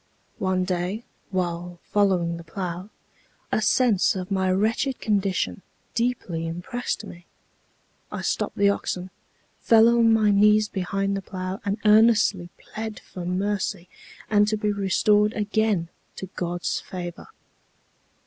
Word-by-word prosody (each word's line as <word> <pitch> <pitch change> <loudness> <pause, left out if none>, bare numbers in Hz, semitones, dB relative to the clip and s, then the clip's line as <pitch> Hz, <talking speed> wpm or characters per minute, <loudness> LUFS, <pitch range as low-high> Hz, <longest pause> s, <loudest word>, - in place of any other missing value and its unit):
One 185 -1 +1
day, 180 +4 -2 0.3
while 175 -2 -3
following 185 -5 +1
the 170 - -9
plow, 180 +2 -5 0.6
a - - +1
sense 220 -4 +3
of 185 +1 -5
my 190 -1 +1
wretched 225 +7 +1
condition 195 -2 0 0.3
deeply 230 -9 -1
impressed 195 +8 -4
me. 175 -2 -12 0.8
I - - -5
stopped - - -1
the 200 - +4
oxen, 185 -2 -1 0.5
fell 225 0 +6
on 235 -1 +4
my 215 -2 +4
knees 210 +1 +5
behind 195 0 -2
the 195 - -3
plow, 185 -1 -5
and 200 +1 -1
earnestly 210 -4 +4
pled 220 0 -7
for 180 -2 -9
mercy, 190 -1 -2 0.4
and 210 -1 +4
to 215 0 0
be 210 0 0
restored 205 +2 +2
again 210 -4 0 0.3
to - - -6
God's 175 0 -2
favor. 175 -2 -7
195 Hz, 130 wpm, -24 LUFS, 180-215 Hz, 0.8 s, fell